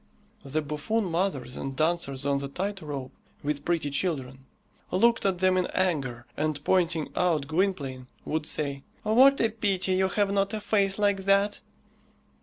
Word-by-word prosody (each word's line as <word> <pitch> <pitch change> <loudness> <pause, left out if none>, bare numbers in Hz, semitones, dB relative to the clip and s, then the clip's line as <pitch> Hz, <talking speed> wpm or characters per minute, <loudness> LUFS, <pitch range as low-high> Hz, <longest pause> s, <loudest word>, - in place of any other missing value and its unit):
The 150 +3 -2
buffoon 150 +10 -1
mothers 165 -8 -1
and 135 0 -5
dancers 155 -3 0
on 140 -1 +2
the 140 - -4
tight 195 +7 -4
rope, 140 -4 -5 0.3
with 145 0 -2
pretty 165 -4 0
children, 135 -5 -2 0.4
looked 230 +2 +3
at 190 -2 0
them 185 0 +3
in 185 - +1
anger, 135 -10 0
and 155 -1 -1
pointing 170 -4 +1
out 165 -6 +1
Gwynplaine, 145 -6 -1 0.2
would 155 0 -2
say, 140 -3 -2 0.2
"What 260 +6 +6
a 225 - +3
pity 195 -4 0
you 190 0 +3
have 200 +1 +1
not 200 +1 +1
a - - -2
face 200 -2 +1
like 200 -2 +1
that!" 200 +1 +2
170 Hz, 160 wpm, -27 LUFS, 140-195 Hz, 0.4 s, What